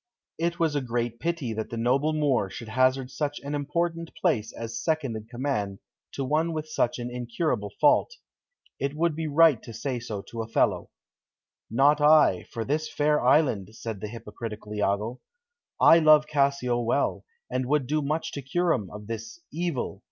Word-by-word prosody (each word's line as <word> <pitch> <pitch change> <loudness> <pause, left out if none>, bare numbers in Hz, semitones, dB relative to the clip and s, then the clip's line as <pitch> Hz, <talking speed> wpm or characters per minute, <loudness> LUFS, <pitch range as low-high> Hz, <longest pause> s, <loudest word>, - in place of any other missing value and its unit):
It 170 +1 0
was 160 -3 +2
a 145 - +1
great 120 -1 -2
pity 165 -7 -2
that 110 0 -4
the 115 - -5
noble 130 +6 +2
Moor 145 -10 +1
should 110 +3 -8
hazard 130 +2 +2
such 145 +2 -3
an 140 +1 -5
important 165 +3 -2
place 120 - +1
as 115 0 -6
second 155 -6 -1
in 110 -1 -6
command 120 -6 -2 0.4
to 135 - -3
one 160 +4 +1
with 155 -1 -4
such 120 -6 0
an 120 0 -5
incurable 120 -2 -2
fault. 150 - +4 0.7
It 140 +1 -2
would 165 0 +1
be 160 0 -3
right 150 -4 +5
to 115 - -10
say 130 +1 -3
so 110 -4 -6
to 115 - -6
Othello. 115 0 0 0.8
"Not 140 +6 +4
I, 150 - +5
for 115 -1 -4
this 155 +3 -1
fair 150 -1 +1
island," 120 - +2
said 110 -3 -6
the 105 - -3
hypocritical 105 -1 -7
Iago. 105 +4 -1 0.6
"I 165 - +8
love 155 -1 +6
Cassio 140 -5 +1
well, 120 +4 0 0.3
and 130 0 -1
would 145 -1 +2
do 150 +4 0
much 150 +3 -2
to 140 - -5
cure 170 +6 +1
him 100 -7 -3
of 105 0 -9
this, 115 +6 -6
evil. 165 -5 -2
135 Hz, 175 wpm, -26 LUFS, 115-155 Hz, 0.8 s, I